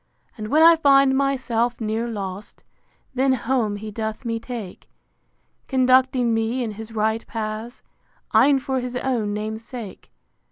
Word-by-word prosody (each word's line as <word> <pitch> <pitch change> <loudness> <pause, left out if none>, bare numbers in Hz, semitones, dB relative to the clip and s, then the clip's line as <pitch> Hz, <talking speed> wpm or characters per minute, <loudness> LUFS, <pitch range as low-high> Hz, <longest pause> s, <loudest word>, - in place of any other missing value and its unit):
And 215 -1 -6
when 310 +7 +4
I 335 0 +8
find 275 -3 +5
myself 250 -3 0
near 225 +1 -2
lost, 200 -3 -7 0.5
Then 260 +1 +2
home 240 -4 0
he 215 +1 -7
doth 220 +3 -5
me 230 -1 -2
take; 230 -6 -8 0.8
Conducting 255 -2 +3
me 225 +3 0
in 225 - -3
his 220 +2 -9
right 220 +1 0
paths, 220 +2 -5 0.5
E'en 280 -1 +5
for 265 0 -2
his 250 0 -5
own 245 -5 -1
name's 220 +1 -4
sake. 235 -5 -9
235 Hz, 145 wpm, -22 LUFS, 220-260 Hz, 0.8 s, I